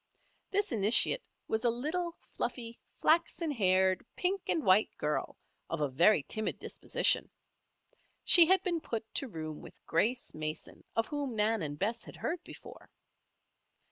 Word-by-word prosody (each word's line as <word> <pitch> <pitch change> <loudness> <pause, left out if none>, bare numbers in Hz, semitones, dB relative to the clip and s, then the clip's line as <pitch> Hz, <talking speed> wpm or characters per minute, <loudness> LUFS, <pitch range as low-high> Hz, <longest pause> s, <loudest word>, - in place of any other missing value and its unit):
This 405 +1 -1
initiate 220 - +6 0.3
was 220 +1 -2
a 240 - +3
little, 320 +9 -3 0.2
fluffy, 235 -2 -5 0.2
flaxen 335 0 +1
haired, 190 -6 +2
pink 380 +2 -1
and 320 - 0
white 190 +3 +4
girl, 150 0 -3 0.3
of 165 - -3
a 150 - 0
very 165 +5 +3
timid 215 +9 -3
disposition. - - +2 0.9
She 340 -3 +8
had 380 +1 +4
been 345 -3 -2
put 230 -7 -5
to 275 - 0
room 155 -7 -7
with - - -15
Grace 230 +9 -1
Mason, 155 0 -6
of 225 - +1
whom 285 -4 -4
Nan 220 0 +1
and 145 -2 -4
Bess 220 +7 -2
had - - -12
heard 345 +1 -4
before. - - -13
225 Hz, 145 wpm, -31 LUFS, -, 0.9 s, She